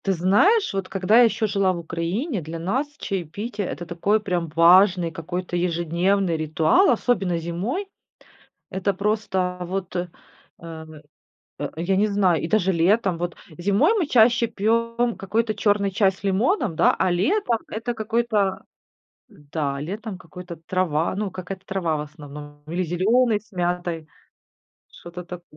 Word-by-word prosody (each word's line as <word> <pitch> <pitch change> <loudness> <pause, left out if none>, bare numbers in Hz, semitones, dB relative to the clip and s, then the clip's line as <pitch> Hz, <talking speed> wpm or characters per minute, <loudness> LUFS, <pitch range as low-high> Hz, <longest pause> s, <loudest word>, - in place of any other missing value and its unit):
Ты 195 - +2
знаешь, 205 - +3
вот 195 -1 -3
когда 195 +3 +2
я - - +8
ещё 225 -1 0
жила 195 -2 +1
в - - -5
Украине, 175 - -3
для 160 +2 -6
нас 240 - -1
чаепитие 200 +3 -4
это 165 +6 -5
такой 180 +5 +1
прям 180 -5 -2
важный 175 +1 +5
какой-то 175 +2 -5
ежедневный 175 +1 +1
ритуал, 155 - +3
особенно 205 -8 +1
зимой. 185 - -3 0.8
Это 190 +1 0
просто 190 -2 -1
вот, 185 +1 -4
э, 175 0 -2 0.5
а 160 -2 -9 0.8
я 175 +4 0
не 210 +2 +3
знаю, 195 -5 +2
и - - -2
даже 190 0 +2
летом. 185 +2 +2
Вот 175 0 -3 0.2
зимой 200 - +3
мы 340 - 0
чаще 235 -1 +4
пьём 230 +2 0
какой-то 215 +3 -1
чёрный 205 -1 +1
чай 195 0 +3
с 190 - -18
лимоном, 200 - +1
да, - - +4
а 185 - +2
летом 235 - +1
это 230 +3 -3
какой-то 220 -3 0 0.9
Да, 140 -3 -2
летом 205 +5 -5
какой-то 180 0 -10
трава 170 -3 0
ну 205 -1 -2
какая-то 185 +1 -7
трава 185 -5 -1
в - - -3
основном 145 -1 -10
или 175 +3 -1
зелёный 215 +8 +2
с 220 - -29
мятой. 175 -2 -2 0.8
Что-то 175 +1 -10
тако 175 0 -8
185 Hz, 145 wpm, -23 LUFS, 170-215 Hz, 0.9 s, я